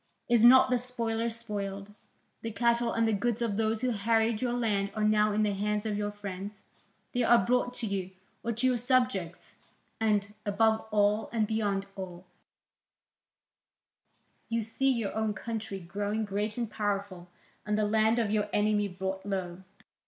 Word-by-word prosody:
Is 235 -2 +4
not 255 +1 +8
the 250 - +3
spoiler 235 -2 -2
spoiled? 205 -3 -5 0.5
The 225 - -3
cattle 235 +1 +1
and 230 0 +1
the 220 - +2
goods 235 +3 0
of 230 -4 -1
those 220 0 0
who 255 -1 +1
harried 225 +1 +1
your 245 -1 0
land 210 -5 0
are 215 - -1
now 215 0 +3
in 215 +1 +1
the 210 -1 +1
hands 210 +2 -1
of 215 -1 -1
your 205 0 -1
friends, 200 0 -7 0.5
they 245 - +1
are 235 -4 +5
brought 245 +1 +2
to 240 - -3
you, 195 -3 -2 0.3
or 235 - -2
to 235 +3 -1
your 255 -1 +3
subjects. 245 -8 0 0.5
And, 210 -2 +1
above 220 +2 +2
all 210 0 +2
and 225 -2 +1
beyond 205 -3 -1
all, 185 -2 -8 2.2
you 230 -1 0
see 270 +5 0
your 230 -6 -1
own 220 -1 -1
country 215 -2 -5
growing 205 +5 -2
great 210 +2 -2
and 235 -1 -1
powerful 200 -4 -3 0.3
and 210 0 -1
the 215 - +2
land 220 +2 +3
of 225 -3 +1
your 210 -1 0
enemy 210 0 +2
brought 190 0 -4
low. 190 -3 -4
215 Hz, 165 wpm, -29 LUFS, 200-230 Hz, 2.2 s, not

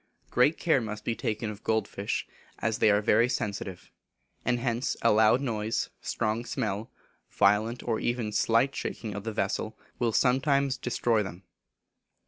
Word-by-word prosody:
Great 140 +6 +4
care 160 -6 +2
must 105 -1 -6
be 115 - 0
taken 110 0 -2
of 105 0 -11
gold 110 -2 +1
fish, 100 +1 -3 0.3
as 110 -1 -1
they - - +5
are 105 +1 +3
very 115 +4 +4
sensitive; 100 -5 -4 0.5
and 125 0 +1
hence 120 0 -1
a - - +5
loud 110 +4 +5
noise, 110 -4 -1
strong 110 +2 -1
smell, 110 -1 -3 0.4
violent 110 +4 +2
or 115 -2 -1
even 120 -3 -1
slight 115 +5 +2
shaking 110 -3 -4
of 100 +1 -6
the 115 - -2
vessel, 110 +2 -2 0.2
will 120 -2 +2
sometimes 135 +3 +2
destroy 120 -3 +1
them. 95 -2 -7
110 Hz, 155 wpm, -28 LUFS, 105-125 Hz, 0.5 s, they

